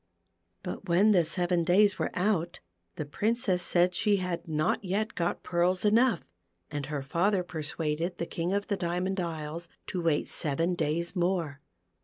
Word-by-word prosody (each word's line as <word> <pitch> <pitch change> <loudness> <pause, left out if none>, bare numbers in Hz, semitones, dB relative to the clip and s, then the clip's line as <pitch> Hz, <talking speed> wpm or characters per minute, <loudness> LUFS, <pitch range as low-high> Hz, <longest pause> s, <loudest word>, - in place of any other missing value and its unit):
But 200 - -6
when 190 +6 +5
the 180 -4 +5
seven 175 +1 0
days 200 +4 +4
were - - 0
out, 180 -3 0 0.4
the 150 - -4
Princess 205 +3 0
said 175 +1 +2
she 210 +3 +2
had 180 -2 -3
not 155 +4 0
yet 205 +4 -1
got 170 0 -2
pearls 180 +2 +1
enough, 225 -2 +4 0.5
and 145 -2 -3
her 145 -2 -3
father 180 +6 +1
persuaded 160 +1 -3
the 170 - -2
King 170 +1 -3
of 200 +1 0
the 200 - -1
Diamond 180 +2 -1
Isles 165 0 -4 0.2
to 180 - -3
wait 165 -3 +1
seven 165 +4 0
days 170 +2 -1
more. 170 -5 -1
175 Hz, 160 wpm, -29 LUFS, 165-190 Hz, 0.5 s, when